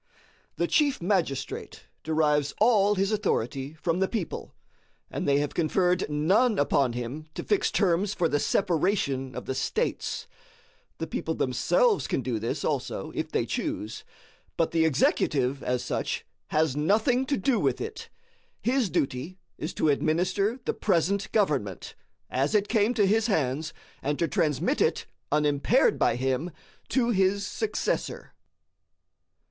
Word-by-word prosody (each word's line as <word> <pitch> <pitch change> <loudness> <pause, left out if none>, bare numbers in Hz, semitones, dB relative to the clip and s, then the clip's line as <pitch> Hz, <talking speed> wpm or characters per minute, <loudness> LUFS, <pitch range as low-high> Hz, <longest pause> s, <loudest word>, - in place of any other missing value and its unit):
The - - +1
chief 290 -4 +2
magistrate 170 -8 -2 0.2
derives 150 -2 +1
all 210 -2 +4
his 195 +2 +1
authority 140 - -1
from 165 +2 -1
the 190 - +2
people, 210 -6 -4 0.6
and - - -3
they 140 0 +4
have 145 0 -1
conferred 180 +2 +1
none 195 +10 +3
upon 140 -3 +2
him 125 +6 -5
to - - -4
fix 415 - +1
terms 195 +1 +1
for 170 - +2
the 145 -2 0
separation 155 -9 0
of - - -6
the - - -2
states. 445 - -2 0.7
The - - -3
people - - -3
themselves - - +2
can 130 - -1
do 120 -4 -2
this 115 - -3
also - - -2
if - - -3
they - - +1
choose; 110 +2 -4 0.5
but 165 - +1
the 165 -1 +3
executive, 135 -2 +1
as 125 0 -1
such, - - -2 0.2
has 155 -3 +1
nothing 220 - +2
to 280 - +1
do 240 +4 +1
with - - +1
it. - - -6 0.5
His 245 -4 +1
duty 150 +2 -2 0.2
is 155 - -3
to 155 - +2
administer 180 - +1
the - - 0
present 200 +1 0
government, 140 - 0 0.3
as 135 +10 0
it 205 -1 +3
came 220 +2 +2
to 210 -3 +4
his 220 +3 +2
hands, 155 - 0 0.3
and 145 +1 -1
to 170 - +1
transmit 150 -5 0
it, - - +1 0.3
unimpaired 150 - +3
by - - +3
him, 130 +6 -1 0.4
to 240 -3 +2
his 195 0 +2
successor. 435 - -2
165 Hz, 145 wpm, -27 LUFS, 140-205 Hz, 0.7 s, all